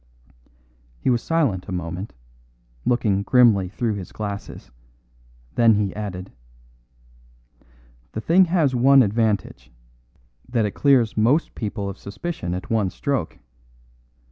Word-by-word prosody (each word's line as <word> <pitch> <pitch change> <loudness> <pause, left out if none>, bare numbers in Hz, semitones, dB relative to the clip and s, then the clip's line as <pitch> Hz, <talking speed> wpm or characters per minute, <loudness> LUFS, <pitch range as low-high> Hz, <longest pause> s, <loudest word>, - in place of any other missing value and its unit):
He 130 - +1
was 120 -1 +1
silent 140 - 0
a - - -7
moment, 90 +3 -5 0.7
looking 105 -5 +1
grimly 105 -5 +4
through 115 +2 -2
his 95 -3 -7
glasses; 100 -1 -7 0.8
then 115 -2 +4
he 100 -2 -1
added: 95 -3 -6 1.8
"The 110 - -4
thing 180 +9 +4
has 165 -6 +1
one 135 +2 +6
advantage 105 - -1 0.8
that 115 -3 +1
it 105 - -2
clears 125 -2 +2
most 125 +10 +2
people 105 -2 -4
of 100 -1 -7
suspicion 100 - -5
at 90 - -7
one 110 -4 +1
stroke. 130 - -3
110 Hz, 115 wpm, -22 LUFS, 100-125 Hz, 1.8 s, one